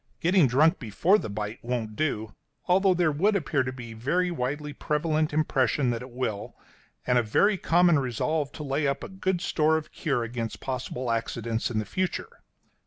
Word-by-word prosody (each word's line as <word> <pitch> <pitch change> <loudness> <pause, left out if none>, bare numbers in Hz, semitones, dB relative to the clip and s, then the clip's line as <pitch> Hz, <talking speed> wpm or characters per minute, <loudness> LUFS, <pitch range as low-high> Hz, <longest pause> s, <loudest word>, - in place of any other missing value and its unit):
Getting 175 -3 +4
drunk 155 +8 +3
before 160 - +2
the - - -5
bite 105 +2 -4
won't 115 -3 -3
do, 110 -8 -2 0.3
although 190 +1 +4
there 170 -3 +2
would 195 +9 +2
appear 150 -6 +1
to 130 0 -2
be 125 -3 -9
a - - -9
very 175 +10 0
widely 145 0 -3
prevalent 155 +1 0
impression 140 -4 +1
that 115 0 -3
it 125 - -8
will, 120 -5 -4 0.5
and 125 -1 +3
a - - +3
very 200 - +3
common 175 -3 +4
resolve 140 +4 -1
to 155 - -7
lay 140 +1 0
up 140 0 -1
a - - -6
good 190 -2 -1
store 160 -3 +2
of 155 - -7
cure 135 -7 -1
against 115 -1 -4
possible 130 -1 -3
accidents 115 0 -2
in 115 - -3
the 110 - -1
future. 185 - -3
140 Hz, 185 wpm, -27 LUFS, 120-165 Hz, 0.5 s, Getting